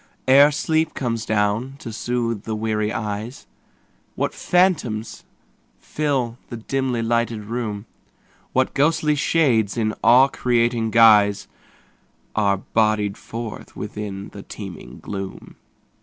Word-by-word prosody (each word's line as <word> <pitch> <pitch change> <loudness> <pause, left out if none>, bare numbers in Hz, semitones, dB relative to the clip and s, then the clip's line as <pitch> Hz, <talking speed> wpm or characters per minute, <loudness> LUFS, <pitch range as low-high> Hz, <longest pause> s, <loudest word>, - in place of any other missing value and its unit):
Ere 140 +3 +7
sleep 160 +2 0
comes 115 -4 -3
down 110 +5 0
to 115 -5 -8
soothe 115 -2 -2
the 110 0 -4
weary 110 -1 -1
eyes, 105 +3 -5 0.7
What - - -1
phantoms 155 - 0 0.5
fill 130 -6 -2
the 120 - -6
dimly 125 0 -2
lighted 115 -1 0
room; 110 -2 -4 0.7
What 130 0 +1
ghostly 150 +1 +2
shades 130 -9 +2
in 110 -2 0
awe 130 +3 +7
creating 120 -3 0
guise 105 -3 +5 0.9
Are 100 -2 +2
bodied 105 0 0
forth 115 -1 -8
within 100 -2 -6
the 100 - -10
teeming 95 -3 -9
gloom. 95 -2 -7
115 Hz, 110 wpm, -22 LUFS, 105-130 Hz, 0.9 s, Ere